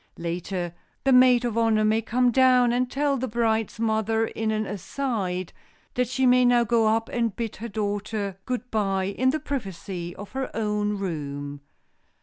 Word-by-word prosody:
Later, 175 +1 -3 0.3
the 270 - +4
maid 250 -1 +6
of 230 -1 0
honor 220 -2 +3
may 220 +1 +2
come 245 +2 +2
down 250 -1 +5
and 250 0 +1
tell 280 +1 0
the 260 +1 -2
bride's 225 -1 0
mother 220 0 +1
in 225 0 -3
an 215 0 0
"aside" 195 -3 -3 0.4
that 250 0 0
she 260 +2 0
may 250 0 +5
now 245 -1 +5
go 230 -1 +2
up 225 +1 +1
and 230 -4 -1
bid 230 -2 -4
her 235 +2 -6
daughter 205 -1 -3
good 250 0 -3
by 195 -3 0
in 200 +7 +1
the 310 +4 0
privacy 195 - -5
of 205 - -9
her 265 0 -3
own 210 -1 0
room. 145 -6 -5
220 Hz, 170 wpm, -25 LUFS, 200-245 Hz, 0.4 s, maid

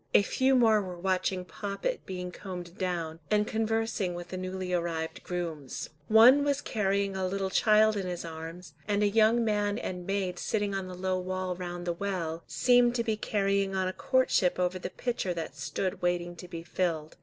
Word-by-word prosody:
A - - +7
few 260 +5 +2
more 225 -4 +5
were 180 -2 -6
watching 185 0 0
Poppet 205 - -4
being 180 -1 -4
combed 180 -2 -8
down, 170 -3 -2
and 210 0 +3
conversing 225 -4 -1
with 175 0 -7
the 185 - -5
newly 185 0 -4
arrived 165 -2 -2
grooms. 165 -8 -4 0.2
One 240 +6 +8
was 285 -1 +1
carrying 200 -6 0
a 190 -1 0
little 190 0 -2
child 215 +1 +5
in 195 -2 -2
his 175 -1 -4
arms, 165 0 -8
and 205 0 +2
a - - +5
young 225 +3 +4
man 205 -1 +1
and 180 -5 -5
maid 190 -2 -1
sitting 205 -2 -1
on 195 -1 -3
the 185 - -7
low 185 0 0
wall 185 0 -2
round 175 -1 -5
the 175 - 0
well, 170 -3 -3
seemed 245 -1 +4
to 235 - +1
be 220 -2 0
carrying 200 -2 0
on 190 -1 +1
a 185 - -2
courtship 260 -9 +2
over 180 0 0
the - - -4
pitcher 235 -7 -2
that 160 -3 -5
stood 150 +7 -3
waiting 175 0 0
to 180 - -9
be 165 -1 -7
filled. 165 -3 -2
185 Hz, 190 wpm, -29 LUFS, 175-210 Hz, 0.2 s, One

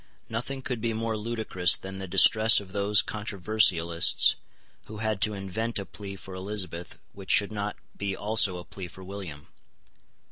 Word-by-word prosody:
Nothing 125 +4 -4
could 125 -3 -4
be 115 0 -1
more 115 0 -2
ludicrous 105 -4 +1
than 95 0 -8
the 95 - -6
distress 110 +4 +6
of 100 -2 -12
those 100 +1 +3
controversialists 95 -5 +3 0.5
who 110 - -9
had 110 -2 -2
to 105 +1 +1
invent 105 +4 -3
a 100 - -3
plea 100 -1 -9
for 95 0 -11
Elizabeth 95 -3 -4 0.2
which 95 -1 -12
should 100 0 +4
not 105 -1 -4 0.2
be 100 -1 -3
also 105 -3 +2
a 90 - -9
plea 95 -2 -8
for 95 +2 -13
William. 90 -7 -9
100 Hz, 165 wpm, -27 LUFS, 95-110 Hz, 0.5 s, distress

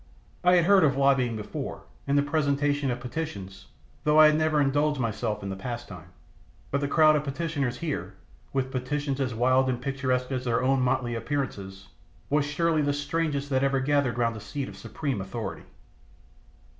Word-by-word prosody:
I 180 0 +6
had 175 -2 +4
heard 195 0 +6
of 140 -3 +3
lobbying 135 -4 +3
before, 105 -1 -6 0.2
and 140 +1 +2
the 140 - +4
presentation 145 -1 +1
of 125 0 -2
petitions, 120 -9 -6 0.4
though 150 +1 +4
I 155 - +10
had 150 0 +5
never 155 -1 +2
indulged 145 +1 +2
myself 110 -2 -2
in 100 - -4
the 95 - -3
pastime; 120 +5 -7 0.6
but 140 - 0
the 140 - 0
crowd 155 +1 +5
of 150 - 0
petitioners 140 -4 -2
here, 115 - -4 0.4
with 130 -1 -1
petitions 140 +2 -2
as 125 -3 -1
wild 130 +3 +3
and 125 -2 -1
picturesque 130 -1 -1
as 130 -1 -2
their 120 0 +1
own 135 0 +2
motley 125 -1 0
appearances, 105 -7 -4 0.4
was 145 0 +3
surely 155 +1 +1
the 145 -1 +1
strangest 145 -1 -2
that 130 0 +2
ever 135 0 +2
gathered 135 -3 +1
round 115 -1 +1
a - - -6
seat 140 +5 -5
of - - -9
supreme 135 -9 -4
authority. 105 +4 -6
135 Hz, 180 wpm, -27 LUFS, 125-145 Hz, 0.6 s, I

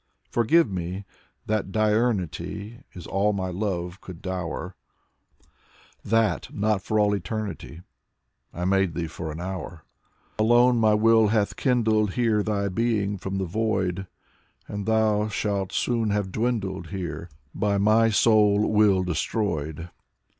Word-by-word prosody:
Forgive 120 +8 +3
me 95 0 -5 0.4
that 110 -3 -1
diurnity 105 - -1
Is 90 -3 -9
all 100 +2 +1
my 95 -2 -2
love 90 -1 -3
could 90 -3 -10
dower; 90 0 -4 1.3
That 110 - +1
not 105 -1 0
for 110 +2 0
all 105 -1 +3
eternity, 95 -3 -5 0.3
— - - -53 0.3
I 90 - -4
made 95 -2 +1
thee 85 - -2
for 80 0 -6
an 80 - -7
hour. 90 -3 -6 0.6
Alone 120 +2 +4
my 110 -1 +4
will 110 0 +5
hath 105 -1 +1
kindled 110 -6 +1
here 115 -4 +2
Thy 100 -1 -1
being 100 -1 0
from 95 +1 -4
the 95 - -1
void. 95 -2 -1 0.6
And 100 0 -5
thou 110 -1 +2
shalt 100 -2 -2
soon 115 -3 0
have 100 -2 -1
dwindled 100 -5 -2
here, 85 -3 -5 0.2
By 100 -1 0
my 110 +3 +4
sole 105 -1 +4
will 105 -3 +4
destroyed. 85 -3 -2
100 Hz, 130 wpm, -25 LUFS, 95-110 Hz, 1.3 s, will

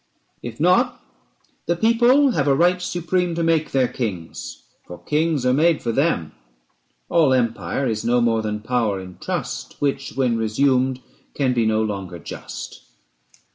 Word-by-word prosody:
If - - -8
not, - - +3 0.7
the 170 - +2
people 240 +7 +4
have 145 - 0
a 140 - +4
right 180 +4 +3
supreme 175 0 -1
To 170 - -1
make 165 -2 +1
their 130 -2 +2
kings, 90 - -6 0.2
for 90 - -9
kings 150 - 0
are 125 - +3
made 160 +3 +2
for 115 - 0
them. 135 - 0 0.8
410 - - -6
All 155 -6 +5
empire 115 0 -1
is 110 -2 -2
no 120 +1 +2
more 115 -2 +2
than 105 -1 -3
power 110 -4 0
in 90 -1 -11
trust, - - -4
Which, 140 -1 -2
when 125 -3 +1
resumed, 130 +3 +1 0.3
can 130 -3 +1
be 115 -2 +1
no 110 0 +2
longer 95 -4 -4
just. 60 -5 -8
130 Hz, 160 wpm, -22 LUFS, 110-160 Hz, 0.8 s, All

